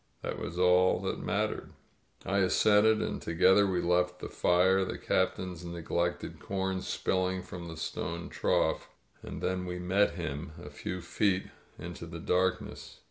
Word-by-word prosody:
That -, -, -3 dB
was 85 Hz, -, -5 dB
all 90 Hz, 0 st, +4 dB
that -, -, -2 dB
mattered. -, -, -2 dB, 0.5 s
I 100 Hz, +1 st, +1 dB
assented, 105 Hz, +3 st, +4 dB
and -, -, -3 dB
together 95 Hz, +4 st, +4 dB
we 90 Hz, -2 st, 0 dB
left 90 Hz, +1 st, +1 dB
the -, -, -7 dB
fire, 95 Hz, +2 st, +3 dB
the -, -, -4 dB
Cap 95 Hz, -, +1 dB
tain's 90 Hz, -2 st, -6 dB
neglected 85 Hz, 0 st, -2 dB
corn 95 Hz, -1 st, -2 dB
spilling 95 Hz, 0 st, -1 dB
from 85 Hz, -1 st, -8 dB
the 80 Hz, -1 st, -7 dB
stone 85 Hz, +1 st, -4 dB
trough. -, -, 0 dB, 0.3 s
And -, -, -7 dB
then 90 Hz, 0 st, 0 dB
we 90 Hz, 0 st, -3 dB
met 95 Hz, +3 st, +2 dB
him 75 Hz, +3 st, -4 dB
a 75 Hz, -3 st, -9 dB
few 90 Hz, +4 st, -5 dB
feet 95 Hz, +2 st, 0 dB, 0.3 s
into 85 Hz, 0 st, -7 dB
the 85 Hz, 0 st, -7 dB
darkness. 90 Hz, +2 st, -1 dB
90 Hz, 155 wpm, -30 LUFS, 85-95 Hz, 0.5 s, all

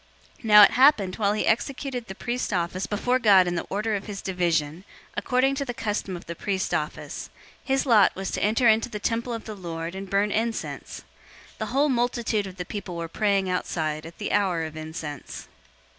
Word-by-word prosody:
001:008 -, -, -21 dB
Now 210 Hz, -1 st, +9 dB
it -, -, +7 dB
happened, 245 Hz, -8 st, +4 dB
while 205 Hz, -2 st, +2 dB
he 210 Hz, -, -1 dB
executed 250 Hz, +1 st, -1 dB
the 190 Hz, -, -7 dB
priest's 240 Hz, +3 st, -3 dB
office 185 Hz, +1 st, -1 dB
before 245 Hz, +5 st, 0 dB
God 200 Hz, -6 st, +6 dB
in 175 Hz, -, -1 dB
the 170 Hz, -, -3 dB
order 215 Hz, +2 st, -1 dB
of 200 Hz, -, -5 dB
his 200 Hz, -2 st, -6 dB
division, 170 Hz, -5 st, 0 dB, 0.3 s
001:009 -, -, -33 dB
according 260 Hz, +2 st, +2 dB
to 275 Hz, +1 st, -2 dB
the 245 Hz, -, -4 dB
custom 205 Hz, -5 st, -3 dB
of -, -, -12 dB
the 170 Hz, -, -5 dB
priest's 190 Hz, +3 st, -2 dB
office, -, -, -4 dB, 0.3 s
his 270 Hz, -1 st, 0 dB
lot 220 Hz, -7 st, +5 dB
was 195 Hz, 0 st, -4 dB
to -, -, -3 dB
enter 225 Hz, +4 st, +3 dB
into 225 Hz, +1 st, +4 dB
the 215 Hz, -, -5 dB
temple 230 Hz, +3 st, -2 dB
of 230 Hz, -1 st, -5 dB
the 220 Hz, -, -6 dB
Lord 170 Hz, -3 st, -5 dB
and 190 Hz, 0 st, -7 dB
burn 200 Hz, +2 st, +1 dB
incense. 225 Hz, +2 st, -3 dB, 0.5 s
001:010 -, -, -25 dB
The -, -, -1 dB
whole 285 Hz, +3 st, +2 dB
multitude 235 Hz, -4 st, 0 dB
of 190 Hz, 0 st, -10 dB
the 180 Hz, -, -4 dB
people 190 Hz, -2 st, -6 dB
were 170 Hz, 0 st, -3 dB
praying 195 Hz, +2 st, +1 dB
outside 160 Hz, -4 st, -2 dB
at 165 Hz, -, -13 dB
the 205 Hz, -, -4 dB
hour 185 Hz, -5 st, +1 dB
of 155 Hz, -1 st, -6 dB
incense. 155 Hz, -2 st, -7 dB
205 Hz, 210 wpm, -25 LUFS, 180-230 Hz, 0.5 s, Now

